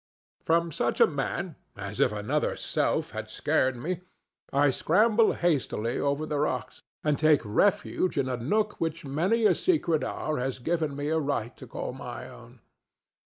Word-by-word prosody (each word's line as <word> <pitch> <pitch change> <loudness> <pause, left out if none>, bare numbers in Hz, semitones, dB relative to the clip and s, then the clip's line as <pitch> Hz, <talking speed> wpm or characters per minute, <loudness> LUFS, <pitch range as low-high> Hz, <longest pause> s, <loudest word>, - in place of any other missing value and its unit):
From 170 +1 +2
such 120 -4 -1
a - - +9
man 160 +3 -3 0.2
as 100 0 -6
if - - +4
another 105 0 -1
self - - 0
had - - -6
scared 130 0 +1
me 170 +8 -3 0.5
I 140 0 +4
scramble 215 - +3
hastily 135 -8 0
over 140 +2 0
the 150 -2 -2
rocks, 130 -6 -2 0.2
and 150 -2 +1
take 155 -2 +5
refuge 190 - +1
in 135 -2 +1
a 130 - -1
nook 205 - -1
which 165 -1 -2
many 185 +12 +1
a - - +6
secret 175 - +1
hour 155 -3 -2
has 130 +1 -2
given 155 +2 -1
me 145 +1 -2
a 160 0 +2
right 140 -6 -2
to - - -11
call - - -5
my - - -7
own. - - -14
150 Hz, 165 wpm, -28 LUFS, 130-175 Hz, 0.5 s, a